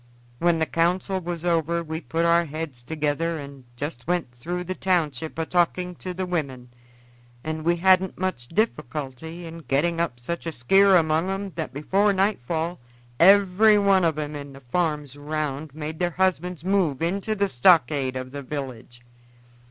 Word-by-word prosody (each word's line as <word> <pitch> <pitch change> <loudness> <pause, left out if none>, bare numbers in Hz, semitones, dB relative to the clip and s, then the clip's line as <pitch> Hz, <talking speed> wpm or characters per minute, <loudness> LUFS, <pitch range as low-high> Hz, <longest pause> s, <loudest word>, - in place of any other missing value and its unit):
When 170 -1 +3
the 160 - +1
council 180 +4 0
was 175 -1 -5
over 170 0 +1
we 160 0 -5
put 165 0 -1
our 170 0 +4
heads 155 -4 -6
together, 160 +4 -1
and 140 -3 -10
just 145 -2 -5
went 175 -7 -1
through 170 +9 -4
the 185 +1 -4
township 160 -6 -1
a 165 - -1
talking 180 +1 +1
to 185 - -6
the 185 +1 -3
women, 140 -8 -3 0.7
and 155 0 -4
we 170 +2 +3
hadn't 185 +1 +3
much 185 -10 -3
difficulty 160 - -3
in 165 0 -8
getting 165 +3 0
up 145 -8 -1
such 170 +8 -5
a - - -1
skear 195 +9 +4
among 160 +2 +1
'em 195 0 -3
that 160 -2 -4
before 195 +9 +1
nightfall 175 - -1 0.4
every 200 +3 +6
one 195 -2 +4
of 160 -3 +1
'em 150 -1 -3
in 140 -1 -8
the 135 - -13
farms 150 0 -2
around 150 -1 -4
made 155 0 -5
their 175 -1 +1
husbands 180 -1 -1
move 180 -7 +1
into 200 +5 -1
the 200 -1 +1
stockade 135 -3 +3
of 130 0 -5
the 140 +1 -6
village. 130 -4 -7
165 Hz, 165 wpm, -24 LUFS, 145-180 Hz, 0.7 s, every